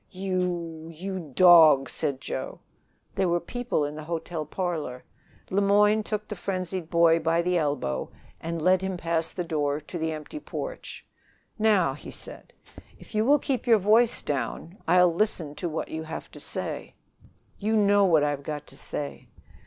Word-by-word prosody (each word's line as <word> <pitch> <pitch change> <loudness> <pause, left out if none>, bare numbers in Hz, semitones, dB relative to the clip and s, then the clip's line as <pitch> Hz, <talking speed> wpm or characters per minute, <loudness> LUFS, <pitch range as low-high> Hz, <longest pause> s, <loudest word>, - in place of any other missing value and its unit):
"You 180 -4 -3
you 190 +4 -5 0.2
dog!" 160 -7 +7
said 135 -2 -2
Joe. - - -5 0.5
There 190 -2 +1
were 175 0 +2
people 245 -3 -2
in 145 - -4
the 155 - -7
hotel 165 -1 -4
parlor. 155 -8 -3 0.5
Le 195 +2 +2
Moyne 205 +2 +4
took 210 0 -4
the 210 - -5
frenzied 185 -2 -4
boy 165 0 +4
by 165 +1 +1
the 180 0 +1
elbow 145 - -2 0.3
and 165 -1 -4
led 185 +1 +4
him 190 -1 -3
past 165 -1 -1
the 180 - -2
door 145 -3 -1
to 160 +3 -7
the 160 0 -1
empty 155 - -7
porch. - - -7 0.5
"Now," 205 -10 +3
he 145 - -10
said, - - -7 0.5
"if - - -15
you 215 0 +2
will 285 +3 +6
keep 260 -4 -2
your 230 -2 +7
voice 220 +4 +3
down, 145 +6 -3
I'll 180 0 +5
listen 170 -6 -1
to 175 -3 -3
what 160 - -4
you 160 - -4
have 160 0 -7
to - - -11
say." - - -5 0.6
"You 215 +2 0
know 205 -1 +4
what 160 -5 +4
I've 145 -1 -1
got 150 0 -5
to - - -15
say." 145 -1 -5
170 Hz, 170 wpm, -26 LUFS, 155-195 Hz, 0.6 s, dog